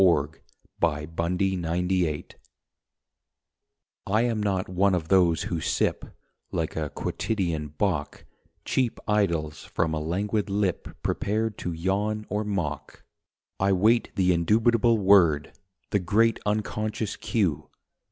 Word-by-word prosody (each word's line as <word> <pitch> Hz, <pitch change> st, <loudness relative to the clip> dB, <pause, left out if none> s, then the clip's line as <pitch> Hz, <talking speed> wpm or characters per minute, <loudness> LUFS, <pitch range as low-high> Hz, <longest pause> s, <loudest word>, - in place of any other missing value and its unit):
IN 95 Hz, -, +7 dB, 0.7 s
UNCERTAINTY 85 Hz, +4 st, 0 dB
TO 85 Hz, -, -4 dB
A 85 Hz, -, -1 dB
LADY 90 Hz, -4 st, 0 dB, 1.8 s
I 110 Hz, +4 st, +2 dB
am 115 Hz, -3 st, 0 dB
not 95 Hz, -2 st, 0 dB
one 95 Hz, +1 st, +2 dB
of 80 Hz, -2 st, -3 dB
those 85 Hz, -5 st, +4 dB
who 85 Hz, -2 st, -3 dB
sip, -, -, 0 dB, 0.5 s
Like 80 Hz, -1 st, -2 dB
a 75 Hz, -2 st, -2 dB
quotidian 85 Hz, -8 st, -2 dB
bock, -, -, -1 dB, 0.4 s
Cheap 125 Hz, -3 st, 0 dB
idylls 85 Hz, -8 st, 0 dB
from 80 Hz, -1 st, -1 dB
a 80 Hz, -, -1 dB
languid 100 Hz, +7 st, -1 dB
lip 100 Hz, -3 st, -1 dB, 0.2 s
Prepared 110 Hz, +1 st, -1 dB
to 90 Hz, -, -3 dB
yawn 100 Hz, +6 st, -1 dB
or 105 Hz, +1 st, -1 dB
mock. 90 Hz, -9 st, -4 dB, 0.6 s
I 95 Hz, 0 st, +3 dB
wait 110 Hz, +6 st, +3 dB
the 90 Hz, -1 st, +3 dB
indubitable 115 Hz, +6 st, +3 dB
word, 95 Hz, -7 st, +4 dB, 0.4 s
The 100 Hz, -, +2 dB
great 110 Hz, +5 st, +2 dB
Unconscious 105 Hz, 0 st, -2 dB
Cue. 85 Hz, -9 st, -1 dB
95 Hz, 125 wpm, -26 LUFS, 85-105 Hz, 1.8 s, IN